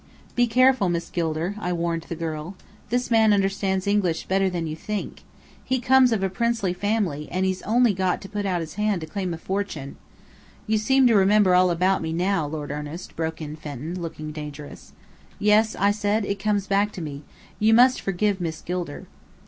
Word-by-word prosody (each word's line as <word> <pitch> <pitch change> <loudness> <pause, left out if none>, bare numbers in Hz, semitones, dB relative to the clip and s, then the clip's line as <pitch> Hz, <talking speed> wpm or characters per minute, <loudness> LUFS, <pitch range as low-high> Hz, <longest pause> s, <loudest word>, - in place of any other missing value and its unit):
"Be 245 0 +3
careful, 255 -4 +4
Miss 170 -1 -3
Gilder!" 165 +2 -1
I 180 -3 -2
warned 170 -1 -1
the 170 - -3
girl. 160 +2 -5 0.3
"This 245 +1 -1
man 220 -1 +5
understands 195 -1 0
English 200 -5 +1
better 190 0 +1
than 175 -2 -3
you 155 -1 -4
think. 210 +5 -5 0.4
He 260 0 0
comes 255 0 +5
of 210 -4 0
a - - +3
princely 230 -4 0
family 185 -7 -1
and 185 +1 0
he's 190 0 -1
got - - -9
only 240 -1 +4
to 185 0 -1
put 205 0 -4
out 180 -2 0
his 160 -1 -7
hand 210 -4 +1
to - - -4
claim 185 +3 -4
a 165 - -4
fortune 175 -6 -4 0.3
" - - -27
"You 220 -1 +1
seem 265 +5 +3
to 240 - +5
remember 200 -1 +4
all 180 0 +5
about 185 +3 +1
me 160 0 -3
now, 180 -2 0
Lord 150 -1 -5
Ernest," 150 +4 -7
broke 160 0 -3
in 150 0 -6
Fenton, 155 +4 -6
looking 155 -2 -6
dangerous. 150 -1 -9 0.4
"Yes," 215 +1 +3
I 200 +1 +3
said. 205 +1 0
"It 200 0 -3
comes 205 -1 0
back 200 +1 +1
to 180 - -6
me. 145 -2 -6 0.4
You 220 +1 +4
must 250 +2 +5
forgive 195 0 0
Miss 160 -2 -3
Gilder." 175 -4 -5
190 Hz, 195 wpm, -24 LUFS, 165-210 Hz, 0.4 s, man